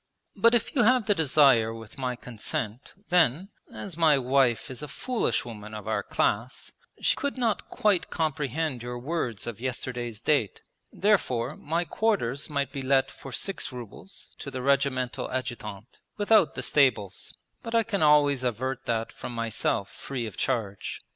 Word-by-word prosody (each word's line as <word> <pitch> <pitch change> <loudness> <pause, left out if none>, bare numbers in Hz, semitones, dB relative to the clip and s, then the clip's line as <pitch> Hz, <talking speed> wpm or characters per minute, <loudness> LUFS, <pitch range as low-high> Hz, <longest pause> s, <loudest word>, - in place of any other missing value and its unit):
'But 230 +1 +5
if 235 - 0
you 255 - +4
have 245 0 +4
the 210 - +4
desire 135 - +4
with 115 +3 -11
my 125 -1 -1
consent, 115 0 -5 0.2
then, 175 +1 +3 0.2
as 195 -5 -7
my 160 -3 +5
wife 130 -2 +2
is 130 - -7
a 150 - -5
foolish 240 - -1
woman 110 -2 -8
of 105 -2 -7
our - - 0
class, 115 +5 -1 0.3
she - - +2
could 285 -2 -3
not 230 -4 0
quite 205 -4 +1
comprehend 150 -3 -1
your 120 0 -5
words 125 - -3
of 120 -2 -6
yesterday's 125 -3 -3
date. 120 -4 +1 0.3
Therefore 150 - +1
my 165 +4 -1
quarters 160 - 0
might 140 -2 -1
be 140 - -4
let 135 0 +2
for 135 - -10
six 190 +1 -2
rubles 125 - -10
to - - -6
the 130 -2 -5
Regimental 135 -2 +1
Adjutant, 120 -4 -5 0.2
without 205 -4 +4
the - - -3
stables; 125 -9 +1 0.3
but 230 0 -4
I 230 - +5
can 200 -3 -2
always 145 -3 +5
avert 130 +2 -2
that 115 -1 -1
from 120 - -7
myself 115 -3 -1
free 130 -4 -5
of 110 - -7
charge. 105 -7 -2
135 Hz, 160 wpm, -27 LUFS, 120-160 Hz, 0.3 s, But